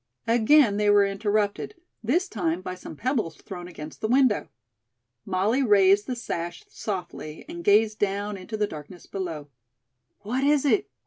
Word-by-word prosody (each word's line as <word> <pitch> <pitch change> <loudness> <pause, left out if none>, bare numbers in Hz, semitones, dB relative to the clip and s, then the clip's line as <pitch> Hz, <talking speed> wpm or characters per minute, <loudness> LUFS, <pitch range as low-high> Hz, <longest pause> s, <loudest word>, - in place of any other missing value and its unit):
Again 230 0 +4
they 210 0 +2
were 205 -1 +6
interrupted. 205 - -1 0.3
This 335 - +1
time 180 - -2
by 185 - -4
some 180 -3 -9
pebbles 225 - -1
thrown 180 -2 -8
against 155 -3 -10
the 215 - 0
window. 255 -2 +3 0.8
Molly 200 +7 +1
raised 205 -3 +4
the 255 - -2
sash 175 -7 -5
softly 175 -6 -6
and 170 0 -7
gazed 210 +2 +4
down 205 +1 -1
into 195 +3 -6
the 210 - +2
darkness 160 0 -10
below. 165 -7 -5 0.7
"What 245 +6 -2
is 290 0 +3
it?" 385 +8 +2
205 Hz, 150 wpm, -26 LUFS, 180-230 Hz, 0.8 s, were